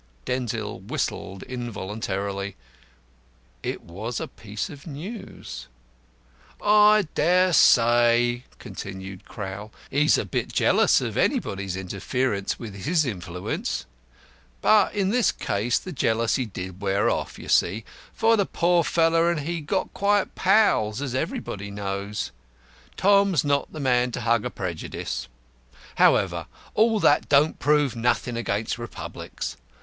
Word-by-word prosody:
'" - - -34
Denzil 115 -5 -3
whistled 95 0 -4
involuntarily. 100 -4 -4 1.1
It - - -4
was 105 +8 -5
a - - -4
piece 105 -1 -6
of 145 +3 -11
news. 155 - -8 0.9
"I 210 -2 +5
dare 180 +3 +3
say," 120 -1 +4
continued 95 -3 -8
Crowl, 105 +1 -7 0.2
"he's 150 +2 +4
a - - -1
bit - - -2
jealous - - +4
of - - -3
anybody's 95 -1 0
interference 100 +3 -2
with 110 -4 -8
his 155 - 0
influence. 90 -6 -4 0.7
But 215 -1 +4
in 195 -2 +1
this 245 0 +3
case 110 +5 -1
the 185 - -6
jealousy 115 -2 +1
did 95 -1 -7
wear 100 0 +1
off, - - -1
you - - -10
see, 105 +6 +2 0.3
for 225 +1 +3
the 200 -3 +1
poor 175 0 +2
fellow 165 0 +3
and 170 -3 +1
he 165 +3 -3
got 185 +6 -2
quite 205 0 +1
pals, 180 - +3
as 135 -3 -3
everybody 100 -5 -3
knows. 100 0 -4 0.7
Tom's 200 -5 +4
not 145 -1 0
the 155 - -7
man 125 -2 +2
to - - -3
hug 115 -1 +2
a - - -1
prejudice. 85 -8 -5 0.7
However, - - +3 0.3
all 220 0 +3
that 145 - +3
don't 145 +2 +4
prove 145 -3 +2
nothing 120 +1 0
against 110 0 -2
Republics. 120 -1 -6
120 Hz, 130 wpm, -25 LUFS, 100-165 Hz, 1.1 s, I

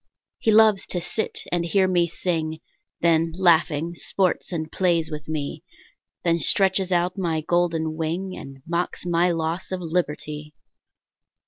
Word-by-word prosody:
He - - 0
loves 215 -2 +5
to 180 - -1
sit 180 +5 -2
and 175 -1 +1
hear 190 +2 +2
me 175 -2 +2
sing, 160 -2 -2 0.4
Then, 165 -1 +3
laughing, 170 -2 +3
sports 185 +2 0
and 160 -3 -3
plays 170 -4 +1
with 150 -1 -6
me; 155 +1 -4 0.6
Then 170 -1 +2
stretches 190 +3 +3
out 180 +2 +1
my 165 -4 0
golden 165 -1 0
wing 170 +4 -3
And 135 -1 -10
mocks 170 +2 -2
my 175 0 +2
loss 165 +2 -2
of 185 - -2
liberty. 150 -3 -3
170 Hz, 140 wpm, -24 LUFS, 160-180 Hz, 0.6 s, loves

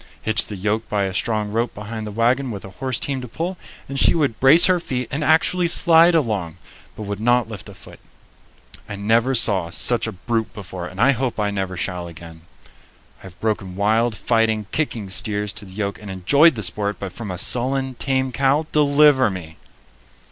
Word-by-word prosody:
Hitch 110 -1 0
the 105 - -6
yoke 105 +3 -2
by 105 -1 0
a 95 -1 -3
strong 105 0 -2
rope 115 +2 -2
behind 110 +1 -6
the - - -6
wagon 120 +5 +1
with 100 -4 -7
a 95 - -10
horse 130 +2 -3
team 135 -2 -3
to 125 - -7
pull, 170 +10 -4 0.3
and 135 0 -4
she - - +4
would 140 -9 0
brace 145 +6 +7
her 185 -1 +3
feet 125 -7 -4
and 150 +2 -2
actually 165 +4 +2
slide 170 0 +5
along, 105 - -1 0.4
but 110 - -7
would 100 0 -5
not 120 +1 +2
lift 100 -6 -9
a - - -12
foot. - - -12 0.9
I 105 - -5
never 115 +6 +1
saw 100 -7 +4
such 115 +6 0
a - - -3
brute 110 +3 -3
before, 95 -3 -7
and 95 - -11
hope 130 -1 +1
I 105 -1 0
never 95 -2 -4
shall 90 -1 -4
again. 80 0 -12 0.8
I - - -20
have 90 - -21
broken 100 -4 -2
wild, 110 +3 +1
fighting, 110 -1 0
kicking 120 -9 -2
steers 105 +1 -1
to 110 -1 -7
the 95 - -13
yoke 100 0 -4
and 105 - -9
enjoyed 140 - +3
the 110 - -4
sport, 100 +3 -2
but 95 -2 -7
from 110 0 -7
a 90 - -5
sullen, 130 +5 0
tame 130 0 -1
cow, 135 +5 +1
deliver 145 -3 +4
me! 85 -4 -8
110 Hz, 200 wpm, -21 LUFS, 100-130 Hz, 0.9 s, brace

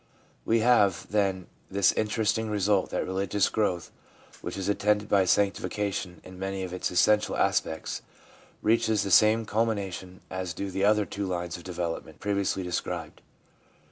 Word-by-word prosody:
We 115 0 +3
have, 105 -6 +3
then, 95 -3 +1 0.2
this 100 -1 +3
interesting 110 +1 0
result, 100 -2 +1
that - - -2
religious 95 +1 0
growth 90 -6 -1 0.5
which - - -5
is 95 -1 -3
attended 105 0 +1
by 100 -2 +4
sanctification 100 -1 0
in 90 0 -12
many 95 0 -3
of 90 -1 -5
its 90 - -2
essential 105 +4 +3
aspects 80 - 0 0.6
reaches 110 -1 +2
the 100 - -3
same 110 +3 +5
culmination 100 -4 -2
as 95 -3 -4
do 100 -1 -4
the 95 +1 0
other 105 0 +4
two 100 0 -4
lines 90 -2 -3
of 85 - -9
development 85 -3 -4
previously 100 -2 -1
described. 90 -2 -4
100 Hz, 145 wpm, -27 LUFS, 90-105 Hz, 0.6 s, same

